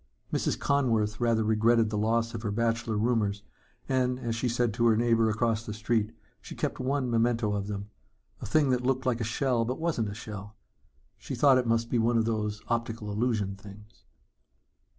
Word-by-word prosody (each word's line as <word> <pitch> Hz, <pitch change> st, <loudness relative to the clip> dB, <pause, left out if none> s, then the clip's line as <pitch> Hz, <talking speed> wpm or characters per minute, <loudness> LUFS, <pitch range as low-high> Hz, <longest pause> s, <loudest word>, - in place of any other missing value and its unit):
Mrs. -, -, 0 dB
Conworth 115 Hz, -7 st, +1 dB
rather 115 Hz, -2 st, +2 dB
regretted 110 Hz, +1 st, +3 dB
the -, -, -2 dB
loss 115 Hz, +2 st, +1 dB
of 115 Hz, -, -5 dB
her 110 Hz, -, -2 dB
bachelor 115 Hz, 0 st, 0 dB
roomers 105 Hz, -3 st, 0 dB, 0.4 s
and, 125 Hz, -1 st, +1 dB
as 115 Hz, -3 st, -3 dB
she 120 Hz, +2 st, -1 dB
said 120 Hz, -1 st, 0 dB
to 120 Hz, +1 st, +2 dB
her 110 Hz, -2 st, +4 dB
neighbor 115 Hz, -1 st, +3 dB
across 110 Hz, +1 st, 0 dB
the 105 Hz, -2 st, -6 dB
street, 110 Hz, 0 st, 0 dB, 0.3 s
she -, -, -9 dB
kept -, -, -3 dB
one 135 Hz, 0 st, 0 dB
memento 115 Hz, -2 st, +1 dB
of 100 Hz, -1 st, -2 dB
them 100 Hz, 0 st, -5 dB, 0.5 s
a -, -, -5 dB
thing 145 Hz, +3 st, +3 dB
that 125 Hz, -1 st, +1 dB
looked 130 Hz, +1 st, 0 dB
like 125 Hz, -2 st, 0 dB
a -, -, 0 dB
shell 120 Hz, +1 st, 0 dB
but 125 Hz, +3 st, -3 dB
wasn't 160 Hz, -10 st, -1 dB
a 100 Hz, -, -7 dB
shell. 105 Hz, -1 st, -8 dB, 0.6 s
She -, -, -5 dB
thought 135 Hz, -3 st, +5 dB
it 125 Hz, -, -1 dB
must 115 Hz, 0 st, +1 dB
be 120 Hz, -, +2 dB
one 115 Hz, +1 st, +2 dB
of 115 Hz, -, +2 dB
them 110 Hz, -2 st, 0 dB, 0.2 s
optical 115 Hz, -2 st, -2 dB
illusion 105 Hz, -3 st, -1 dB
things. 105 Hz, +2 st, -14 dB
115 Hz, 190 wpm, -28 LUFS, 105-120 Hz, 0.6 s, thought